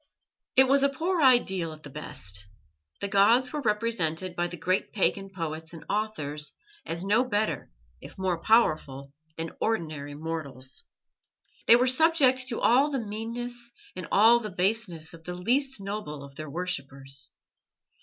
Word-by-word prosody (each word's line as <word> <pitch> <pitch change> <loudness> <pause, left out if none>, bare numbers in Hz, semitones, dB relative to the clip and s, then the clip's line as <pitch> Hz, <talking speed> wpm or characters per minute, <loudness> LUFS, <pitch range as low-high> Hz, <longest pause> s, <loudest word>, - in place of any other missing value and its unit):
It 265 0 +7
was 275 +1 +4
a 280 - +4
poor 335 +5 -1
ideal 190 - +3
at 155 0 -14
the 145 - -10
best. 130 -9 -5 0.6
The 200 - -1
gods 225 +7 +4
were 300 - -2
represented 210 - 0
by 175 0 0
the 175 - -8
great 185 +4 0
pagan 195 -1 0
poets 160 -3 -5
and 165 - -10
authors 155 -9 -2 0.3
as 170 +2 -2
no 210 +6 +3
better, 215 -3 -1 0.3
if - - -12
more 185 -3 -1
powerful, 145 - +2 0.2
than 165 0 -5
ordinary 155 -9 -2
mortals. 150 - -5 0.8
They - - +9
were 245 +1 +4
subject 260 -2 +4
to 235 - -2
all 265 +5 +4
the 280 - -1
meannesses 235 +2 -5 0.3
and - - -6
all 225 +4 +7
the 215 -2 -5
baseness 185 -4 -1
of 165 -1 -13
the 180 +1 -5
least 260 +8 +1
noble 195 -8 -5
of 140 0 -12
their 155 +1 -7
worshippers. 140 -5 -5
195 Hz, 155 wpm, -28 LUFS, 155-235 Hz, 0.8 s, They